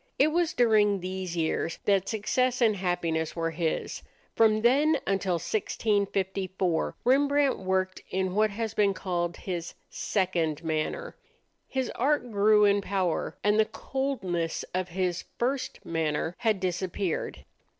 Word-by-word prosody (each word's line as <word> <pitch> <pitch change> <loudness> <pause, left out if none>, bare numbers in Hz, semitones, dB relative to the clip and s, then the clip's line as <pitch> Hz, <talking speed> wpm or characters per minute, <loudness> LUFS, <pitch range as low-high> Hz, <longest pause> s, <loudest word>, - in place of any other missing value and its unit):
It 295 +3 +4
was 340 0 +1
during 215 -4 +4
these 185 -1 -4
years 160 0 -1
that 195 -2 +2
success 250 +4 0
and 225 -4 +4
happiness 175 -4 -1
were 165 -1 -1
his. 165 0 -2 0.3
From 215 -1 +4
then 290 +6 +4
until 195 -1 0
1654 190 -1 -1
Rembrandt 280 +2 +3
worked 185 0 -1
in 190 -1 -1
what 215 +2 +3
has 220 +1 -3
been 200 -3 +2
called 175 -3 -2
his 175 -3 -5 0.2
"second 170 -6 -1
manner." 160 - -2 0.5
His 260 -2 -2
art 265 -1 0
grew 210 0 +5
in 200 0 +3
power, 190 -4 -1
and 210 +1 +3
the 220 - +5
coldness 190 -13 -2
of 185 0 -1
his 180 -1 -2
"first 260 +2 -2
manner" 160 0 -1
had 220 -4 +1
disappeared. 185 -1 -2
195 Hz, 130 wpm, -28 LUFS, 175-225 Hz, 0.5 s, grew